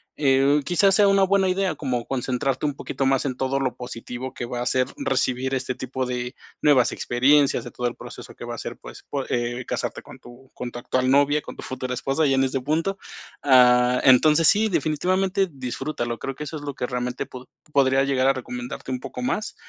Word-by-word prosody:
eh, 140 +1 +3
quizás 190 +5 +3
sea 205 -1 +5
una 195 0 +4
buena 190 0 +3
idea 185 -2 0
como 125 -5 -2
concentrarte 130 +2 -1
un 145 - -3
poquito 135 - -3
más 135 0 +2
en 130 -3 -2
todo 135 +1 -1
lo 130 -2 -1
positivo 125 +1 -7
que 120 - -4
va 120 0 -4
a - - -2
ser 130 0 +2
recibir 130 - 0
este 130 -1 -2
tipo 130 +1 -4
de 125 +1 -4 0.3
nuevas 140 -5 +4
experiencias, 140 +3 +2
de 120 - -9
todo 125 0 -2
el - - -4
proceso - - -11
que - - -9
va - - -5
a - - -6
ser, - - -6
pues - - -12
po 140 -2 -2
eh, 120 +1 -2
casarte - - -3
con - - -13
tu 120 +2 -16
con 125 - -5
tu - - -8
actual 130 +1 0
novia, 145 +2 +3
con - - -10
tu - - -9
futura 130 -1 -4
esposa 135 +5 0
ya 135 - +2
en 135 - +3
este 135 0 -1
punto. 165 +8 -1 0.4
Ah, 125 -2 +5
entonces 150 +4 +6
sí, 215 +4 +4
definitivamente 185 +5 +1
disfrútalo. 125 -2 -4
Creo 135 -1 -4
que 150 - -6
eso 155 - -6
es - - -9
lo 145 -2 -5
que - - -2
realmente 125 0 -3
pod 130 0 -11 0.2
podría 135 -1 +3
llegar 135 -1 +1
a 135 - +5
recomendarte 125 0 -6
un 130 - -2
poco 125 -1 -7
más, 210 +11 -2
135 Hz, 215 wpm, -24 LUFS, 125-150 Hz, 0.4 s, entonces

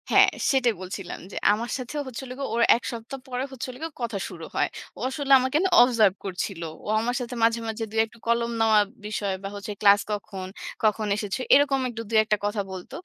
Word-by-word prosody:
হ্যাঁ, - - +7 0.2
সেটাই 255 -4 +3
বলছিলাম 185 0 -6
যে - - -7 0.2
আমার 230 +3 -3
সাথে 255 +3 -7
হচ্ছিল 260 +1 -7
গিয়ে 275 - -3
ওর 235 - +1 0.2
এক 240 - -13
সপ্তাহ 235 +3 -7
পরে 250 0 -2
হচ্ছিল 255 -1 -6
গিয়ে 325 0 -4
কথা 230 -3 -2
শুরু 165 -3 -8
হয়। - - +2 0.3
ও - - -10
আসলে 280 0 -3
আমাকে 260 +3 +1
না 380 - +2
অবজার্ভ 230 -6 +5
করছিল। 185 -1 -4 0.2
ও - - -8
আমার 240 +2 -1
সাথে 245 0 -5
মাঝে, 230 0 +3
মাঝে 225 0 -3
দুই 220 - -1
একটা 230 +1 -19
কলম 235 0 +1
নেওয়ার 220 -2 +5 0.2
বিষয় 205 -2 -2
বা 195 - -3
হচ্ছে, 205 +1 -6
"ক্লাস 205 -1 +7
কখন? 195 -2 -5 0.4
কখন 215 0 +2
এসেছো?" 205 +1 -3 0.2
এরকম 275 -1 +4 0.2
২ 230 0 -4
এক - - -17
টা - - +3
কথা 205 0 0
বলত। 185 -1 -8
225 Hz, 205 wpm, -25 LUFS, 205-250 Hz, 0.4 s, হ্যাঁ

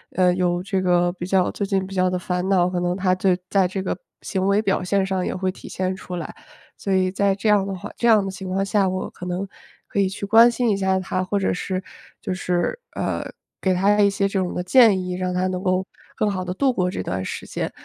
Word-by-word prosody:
呃， 180 -1 +4
有 180 -1 0
这 190 0 -1
个 175 -1 +3
比 175 -1 -6
较 190 -1 +2
最 200 - -3
近 195 -1 0
比 195 - -9
较 185 -1 +2
的 180 - -1
烦 180 +1 -2
恼， 180 -2 +4
可 180 -1 -2
能 175 0 0
他 185 -1 +2
就 185 +1 +1 0.2
在 195 -2 +3
这 190 +1 -4
个 - - -1 0.3
行 190 0 -1
为 200 +1 +3
表 195 -3 0
现 195 +1 +1
上 190 -1 -1
也 - - -2
会 185 0 -1
体 - - -12
现 185 0 -2
出 180 -1 -7
来。 170 -3 -5 0.4
所 195 - -4
以 185 -1 +2
在 195 0 +1
这 205 +2 -3
样 205 -2 +4
的 195 - -3
话 180 - -8
这 235 - 0
样 215 -4 +5
的 195 - -3
情 190 0 -7
况 195 +1 0
下， 195 -1 +2
我 185 0 -3
可 180 - -8
能 180 +2 -3 0.4
可 200 - -2
以 190 -1 +3
去 200 +1 -5
关 225 +4 +7
心 235 -1 +1
一 200 - +1
下 190 -1 +1
他， 185 0 -2
或 200 +2 -1
者 195 - +1
是 185 +1 -3 0.4
就 - - -3
是， 180 - -1 0.2
呃， - - -2 0.4
给 190 - +2
他 205 +3 +3
一 200 - +5
些 195 0 0
这 195 0 -1
种 180 -1 -2
的 180 - -2
建 205 0 +6
议， 180 0 -4
让 180 0 -2
他 180 +1 0
能 185 0 -2
够 185 -1 +1 0.3
更 215 -1 +1
好 185 -2 -3
地 180 0 -4
度 265 +3 +2
过 180 -3 0
这 - - -4
段 95 -1 -3
时 - - -5
间。 - - -4
190 Hz, 280 characters per minute, -22 LUFS, 180-195 Hz, 0.4 s, 关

